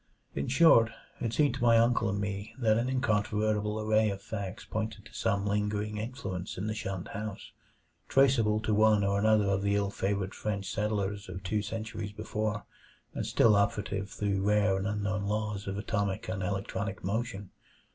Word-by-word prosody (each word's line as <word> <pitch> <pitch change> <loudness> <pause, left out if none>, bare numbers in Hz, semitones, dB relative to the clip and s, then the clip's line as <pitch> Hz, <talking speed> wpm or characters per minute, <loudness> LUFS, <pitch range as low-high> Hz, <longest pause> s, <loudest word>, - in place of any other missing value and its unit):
In 70 - -2
short, 135 -6 +6 0.3
it 115 - -1
seemed 145 +4 +2
to - - -6
my 115 -1 +6
uncle 115 -1 +3
and 100 +1 -1
me 100 +1 -4
that 110 -4 +3
an 120 +3 0
incontrovertible 105 -3 0
array 110 0 +3
of 100 -1 -4
facts 100 -2 -6
pointed 110 0 -4
to - - -15
some 100 0 0
lingering 105 +1 -1
influence 105 -5 -5
in 95 - -3
the 110 - -1
shunned 95 -5 -4
house; 105 0 -6 0.6
traceable 120 -6 +4
to 110 0 0
one 105 -1 +4
or 100 0 +1
another 110 0 +4
of 100 -1 +1
the 100 0 +1
ill 100 -1 0
favored 100 0 -1
French 100 -2 -3
settlers 105 -1 -2
of 95 0 -7
two 105 +3 0
centuries 110 0 -5
before, 105 0 -3 0.5
and - - -3
still 110 -2 +5
operative 100 -1 0
through 100 -2 -1
rare 105 0 +3
and 95 +1 -1
unknown 105 -1 -1
laws 105 -1 -2
of 100 0 -3
atomic 100 -2 -2
and 95 +1 -3
electronic 100 +1 -3
motion. 100 0 -3
105 Hz, 175 wpm, -30 LUFS, 100-110 Hz, 0.6 s, short